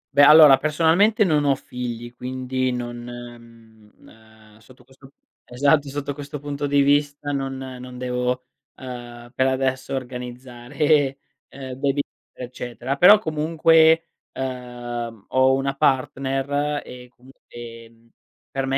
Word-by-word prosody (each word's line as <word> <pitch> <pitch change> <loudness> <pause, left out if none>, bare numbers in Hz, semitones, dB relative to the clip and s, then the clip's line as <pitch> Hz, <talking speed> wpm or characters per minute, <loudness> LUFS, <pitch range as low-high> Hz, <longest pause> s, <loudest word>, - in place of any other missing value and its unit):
Beh, 140 +1 +6
allora 150 -2 +9
personalmente 170 - +3
non 150 -6 +1
ho 140 -1 +3
figli 120 -2 -7
quindi 130 +1 -3
non 120 -1 -5
mhmm, 115 -3 -13
ehm, 110 -1 -20
sotto 125 +3 -20
questo 135 +1 -19 0.3
esatto, 140 +4 +2
sotto 140 +1 -4
questo 145 +1 -7
punto 145 0 -4
di 140 0 +3
vista 145 +1 +1
non 135 -1 -3
non 125 -1 -9
devo, 125 0 -2 0.3
ehm, 120 -2 -10
per 130 0 +1
adesso 130 0 -1
organizzare, 130 +3 -2 0.3
ehm, 130 -1 -9
baby 140 0 +1 0.3
eccetera. 125 +1 -5
Però 200 +7 +8
comunque, 160 0 +3 0.2
ehm, 120 -4 -6
ho 130 0 +3
una 135 +1 -1
partner 135 +2 0
e 125 0 -11
comunque, 130 +2 -21
ehm, 115 -1 -12 0.4
per 135 0 -2
me 135 0 0
130 Hz, 125 wpm, -22 LUFS, 120-145 Hz, 0.4 s, allora